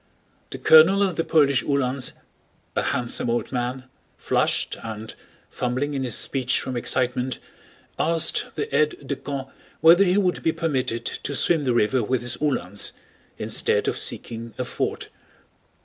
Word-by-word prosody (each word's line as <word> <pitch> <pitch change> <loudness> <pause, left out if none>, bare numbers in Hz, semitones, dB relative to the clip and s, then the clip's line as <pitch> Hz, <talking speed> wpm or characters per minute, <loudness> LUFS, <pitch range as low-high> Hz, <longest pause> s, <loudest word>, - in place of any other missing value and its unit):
The - - -6
colonel 175 +6 +6
of 190 -4 0
the 165 - 0
Polish 140 -5 +3
Uhlans, 135 -2 0 0.6
a - - +2
handsome 120 0 0
old 120 +1 -1
man, 125 0 -2 0.3
flushed - - 0
and, 110 -1 -7 0.4
fumbling 130 +4 -2
in 135 -1 -2
his 120 -4 0
speech 130 -2 +1
from 130 - -4
excitement, 125 +1 -1 0.6
asked 165 0 +1
the - - -3
aide 150 -2 0
de 140 - -1
camp 135 0 -6 0.3
whether 170 +5 +7
he 185 0 +2
would 185 -4 +1
be 160 - +1
permitted 130 -7 -2
to 140 - -4
swim 155 +1 +2
the 125 -2 +1
river 120 +3 +2
with 125 +3 0
his 120 0 -2
Uhlans 100 - -1 0.4
instead - - 0
of - - 0
seeking 115 -1 -5
a 125 - -2
ford. - - -3
130 Hz, 150 wpm, -24 LUFS, 120-150 Hz, 0.6 s, whether